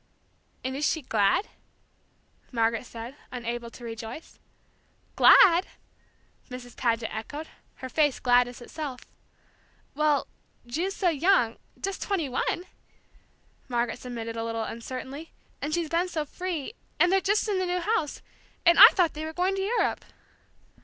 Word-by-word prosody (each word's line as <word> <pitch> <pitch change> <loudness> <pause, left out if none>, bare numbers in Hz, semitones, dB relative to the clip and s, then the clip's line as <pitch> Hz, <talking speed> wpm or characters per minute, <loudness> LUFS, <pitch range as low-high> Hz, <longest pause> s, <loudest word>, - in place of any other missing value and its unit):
"And 260 +1 -3
is 285 - -3
she 315 - -2
glad?" 210 - +2 1.0
Margaret 230 0 0
said, 235 +3 -8 0.2
unable 235 -1 -4
to 240 - -13
rejoice. 230 +5 -8 0.8
"Glad?" 360 -1 +7 0.8
Mrs. 250 -1 -9
Paget 230 -2 0
echoed, 290 +8 -6 0.3
her 260 - -7
face 290 0 +1
gladness 245 0 +2
itself. 265 0 -6 0.9
"Well, 300 -1 +2 0.4
Ju's 340 +11 -2
so 365 - +2
young, 310 -7 +2 0.2
just 390 0 -4
twenty 380 -7 -1
one," 260 +7 -1 1.1
Margaret 240 -1 -1
submitted 230 -2 -6
a 225 - -3
little 225 0 -2
uncertainly; 260 +7 -7 0.3
"and 295 - -2
she's 335 0 0
been 340 +3 +1
so 315 -4 -2
free, 355 +2 -4 0.3
and 355 - +5
they're 385 0 +4
just 410 +4 +1
in 400 -3 0
the 370 - -1
new 360 0 0
house! 350 -5 -1 0.4
And 340 0 +6
I - - +14
thought 350 -5 +2
they 310 +1 -5
were 315 - -6
going 365 +3 +1
to 385 - -2
Europe!" 435 +5 0
290 Hz, 140 wpm, -27 LUFS, 240-350 Hz, 1.1 s, I